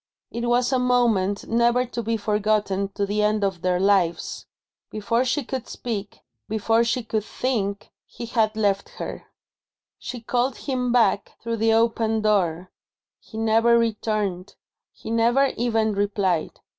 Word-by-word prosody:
It 235 +1 -3
was 245 +2 +2
a 260 - +3
moment, 230 -6 +1
never 235 +2 +2
to 240 -1 -5
be 225 0 -1
forgotten 210 -2 0
to 200 - 0
the 205 +1 -1
end 210 0 +1
of 190 -3 -1
their 180 -1 +1
lives. 190 -3 +1 0.4
Before 230 +3 0
she 270 +3 0
could 260 0 -5
speak, 210 -4 -5 0.3
before 225 +2 +2
she 235 +1 -1
could 220 -1 -2
think, 210 -4 -3 0.2
he 235 - -8
had 220 -2 +1
left 200 -2 0
her. - - -6 0.7
She 250 - -6
called 245 +2 -1
him 250 -3 -2
back, 235 -4 +2
through 230 0 -2
the 225 0 +2
open 225 -1 +1
door. 185 -4 +1 0.5
He 220 - -12
never 225 +1 +4
returned; 215 -5 -1 0.4
he - - -9
never 240 +4 +3
even 225 -2 +1
replied. 200 -4 0
220 Hz, 145 wpm, -24 LUFS, 205-235 Hz, 0.7 s, never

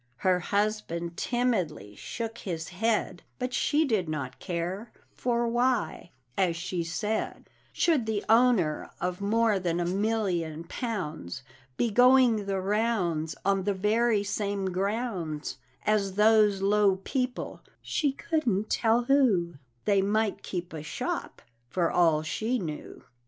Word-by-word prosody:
Her 180 +6 +2
husband 200 -4 -1
timidly 190 - -1
shook 230 - -5
his 165 -4 -4
head; 200 -1 0 0.2
But 250 0 -3
she 305 +5 +2
did 210 - 0
not 140 -5 -4
care 185 +5 -4 0.2
"For 240 -1 0
why," 240 -5 0 0.3
as 180 -3 +2
she 175 0 -3
said, 210 +6 -3 0.2
"Should 295 -10 +2
the 215 -2 -1
owner 225 -9 +3
of 180 +1 -2
more 215 0 +2
than 175 -2 -1
a 175 - 0
million 180 -5 -1
pounds 165 - -4 0.3
Be 235 - +1
going 245 -3 +5
the 195 -1 0
rounds 190 -6 0
On 195 -1 +2
the 200 +1 0
very 215 +2 +2
same 200 -1 -2
grounds 185 - -2 0.3
As 200 -3 +1
those 210 -2 +4
low 200 -1 +4
people, 255 +1 -3 0.2
she 290 -4 0
couldn't 255 - -1
tell 230 +1 +3
who, 235 -11 +3 0.3
They 200 -2 +4
might 210 +1 0
keep 180 -2 -5
a 155 - -5
shop, 150 - -4 0.3
for 175 +1 +1
all 165 -3 +3
she 220 +9 -1
knew." 160 -8 -6
200 Hz, 130 wpm, -28 LUFS, 175-230 Hz, 0.3 s, going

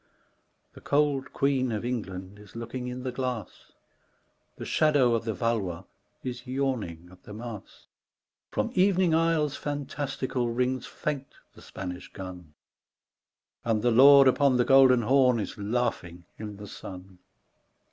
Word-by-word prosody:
The - - -14
cold 145 -2 +1
queen 135 -3 +1
of 110 +1 -3
England 100 -5 -5
is 105 0 -16
looking 120 +2 -5
in 125 0 -5
the 130 - -2
glass; 125 -3 -5 0.9
The - - -6
shadow 145 -6 +3
of 115 -1 -1
the 110 - -1
Valois 95 -5 -1 0.4
is 125 0 -6
yawning 120 -11 -3
at 90 0 -17
the 105 - -11
Mass; 115 -3 -9 0.6
Prom - - -2
evening 185 -2 +3
isles 160 -3 +2
fantastical 140 -3 -3
rings 125 +1 -1
fain 140 -3 -4 0.3
the - - -16
Span 95 -1 -6
ish - - -13
gun, 90 -5 -9 1.1
And 110 -2 0
the 120 - +3
Lord 135 +3 +8
upon 130 0 +4
the 125 - +3
Golden 130 -3 +6
Horn 125 0 +4
is 105 - -4
laughing 100 -6 -2
in 105 -2 -7
the 105 - -9
sun. 95 -1 -10
125 Hz, 140 wpm, -27 LUFS, 105-135 Hz, 1.1 s, Lord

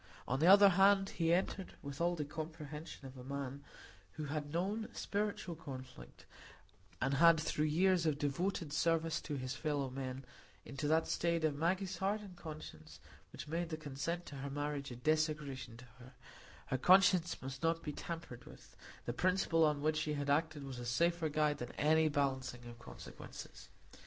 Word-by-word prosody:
On 135 +2 0
the 160 - +4
other 200 +1 +9
hand, 195 +1 +5
he 165 -1 0
entered 185 +2 0
with 140 +1 -6
all 175 +1 +2
the 150 -3 -3
comprehension 155 -1 -7
of 130 0 -9
a - - -8
man 140 +1 -5 0.5
who 155 - -5
had 145 0 -3
known 200 +7 -1
spiritual 205 -3 -2
conflict, 130 - -10 0.7
and 135 +2 +1
lived 165 -2 +7
through 155 -1 0
years 175 +2 +3
of 150 -2 +1
devoted 150 +2 -1
service 165 0 +1
to 150 - -4
his 130 -1 -3
fellow 145 -4 -1
men, 130 0 -5 0.4
into 140 +2 -4
that 160 +2 +3
state 170 -1 0
of 155 - +2
Maggie's 185 +4 0
heart 195 +4 0
and 195 -3 -11
conscience 80 - -9 0.3
which 135 - -8
made 165 +2 -2
the 155 - -3
consent 155 +4 -4
to 140 - -9
the 140 +1 -4
marriage 145 0 -3
a 120 - -7
desecration 150 -3 -1
to 125 - -12
her; 125 +2 -13 0.5
her 130 - -2
conscience 185 +1 +5
must 135 0 -7
not 165 0 +1
be 150 - -4
tampered 165 -7 -7
with; - - -15 0.3
the 120 - -2
principle 180 +1 +2
on 150 -2 +2
which 155 0 +2
she 155 0 -1
had 145 0 -1
acted 155 0 +1
was 135 -3 -6
a - - -5
safer 170 +6 +1
guide 150 -1 +1
than 120 0 -6
any 155 +1 +3
balancing 130 -4 -1
of 120 0 -10
consequences. - - -10
155 Hz, 175 wpm, -36 LUFS, 135-170 Hz, 0.7 s, other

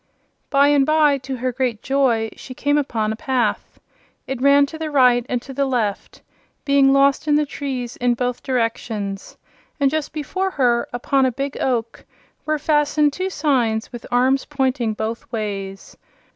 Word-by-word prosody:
By 280 0 +4
and 290 -1 +4
by, 300 -1 +3
to 265 +1 -5
her 255 +1 -1
great 245 -3 -2
joy, 250 -5 +1
she 255 - -10
came 290 +2 +1
upon 220 -6 -1
a - - -6
path. 255 +2 -2 0.5
It 265 -1 -5
ran 280 +1 +5
to 315 +3 -9
the 320 -1 -3
right 250 -4 +4
and 250 - 0
to 270 - -9
the 275 +1 0
left, 225 -6 -3 0.4
being 280 -1 +4
lost 275 +2 +3
in 295 - +4
the 300 0 +2
trees 260 -4 -5
in 245 0 +1
both 245 0 -2
directions, 225 -5 -3 0.4
and 275 -1 +3
just 310 -1 -2
before 375 +6 -2
her, 245 -8 +1
upon 260 +2 +1
a - - 0
big 275 +3 -4
oak, 235 -3 -2 0.4
were 310 0 +1
fastened 295 -1 +2
two 370 +3 -2
signs, 250 -10 0
with 240 - -8
arms 260 +2 +2
pointing 260 -6 -1
both 225 +2 -5
ways. 195 -4 -5
265 Hz, 170 wpm, -21 LUFS, 235-285 Hz, 0.5 s, ran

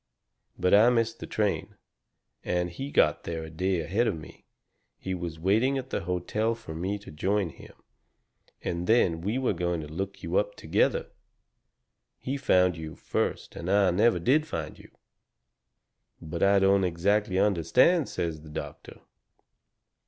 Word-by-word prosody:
But 90 - +1
I 110 +4 +7
missed 115 -1 0
the - - -7
train, 105 -2 -1 0.7
and 90 0 -1
he 135 +11 -6
got 75 - +2
there 80 -1 -4
a 80 - -9
day 90 +2 0
ahead 105 +9 0
of - - -1
me. 75 - -13 0.5
He 95 - -4
was 85 -3 -5
waiting 110 +10 +2
at 130 0 -6
the - - -2
hotel 105 +6 -1
for 80 -8 -9
me 95 +5 -2
to 100 - -12
join 95 +4 0
him, 70 - -14 0.9
and 85 +1 -3
then 90 -8 +3
we 105 +7 -1
were 130 -1 +1
going 90 -1 -1
to 75 - -7
look 95 +7 -5
you 85 +2 -1
up 105 0 0
together. - - 0 1.1
He 135 - -4
found 90 -10 +3
you 80 -1 -7
first - - -3
and 85 - -5
I 100 -1 +4
never 105 +3 +3
did 140 - +2
find - - -5
you." - - -15 1.3
"But 80 +1 -6
I 100 0 +5
don't 95 0 +4
exactly 95 +3 +1
understand," 105 - +3
says 80 -2 -3
the 75 - -13
doctor. 75 - -8
95 Hz, 160 wpm, -27 LUFS, 85-110 Hz, 1.3 s, I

